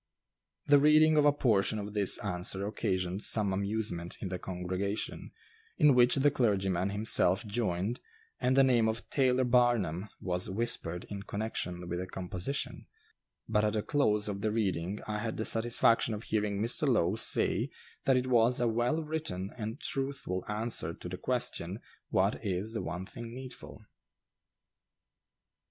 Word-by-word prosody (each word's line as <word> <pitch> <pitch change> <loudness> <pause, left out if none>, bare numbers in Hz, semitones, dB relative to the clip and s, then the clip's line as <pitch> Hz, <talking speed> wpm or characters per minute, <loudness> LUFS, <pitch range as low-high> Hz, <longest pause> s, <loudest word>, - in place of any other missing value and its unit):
The 145 -1 +6
reading 155 +2 +5
of 150 -1 +4
a 145 - +7
portion 110 -7 +2
of 105 0 -5
this 100 -3 +3
answer 95 +1 -2
occasioned 95 -3 -2
some 105 -4 +2
amusement 100 -3 -2
in 95 - -4
the 90 -1 -4
congregation, 95 +3 -4 0.5
in 150 -2 +6
which 125 0 +5
the 145 +1 +3
clergyman 95 -7 +1
himself 100 -1 +2
joined, 105 0 -1 0.4
and 130 +1 +1
the 135 - +7
name 120 -4 +3
of 110 +1 -4
"Taylor 130 -2 +3
Barnum" 120 -7 +2
was 90 -1 -2
whispered 95 -4 -1
in 100 -1 -4
connection 100 -4 -4
with 85 0 -3
the 90 - -4
composition; 95 +9 -4 0.6
but 105 -1 +2
at 105 -1 +1
the 105 -1 -1
close 105 -8 +1
of 100 -1 -4
the 110 - +1
reading 100 -3 -1
I 105 0 -2
had 115 +1 -3
the 110 - -2
satisfaction 115 0 +2
of 105 - -7
hearing 105 -2 -1
Mr. 120 +7 0
Lowe 100 -8 +3
say 110 - +2 0.4
that 135 -1 +4
it 125 - 0
was 125 0 +3
a 120 - +2
well 120 +8 0
written 150 -12 -4
and 110 -1 -5
truthful 135 -9 -3
answer 105 -6 -2
to 90 - -8
the 90 - -5
question, 115 -7 -1 0.3
"What 100 +4 +1
is 100 +2 -2
the 110 - -2
one 90 +3 -5
thing 115 +4 -9
needful?" 130 0 -10
105 Hz, 155 wpm, -31 LUFS, 95-120 Hz, 0.6 s, a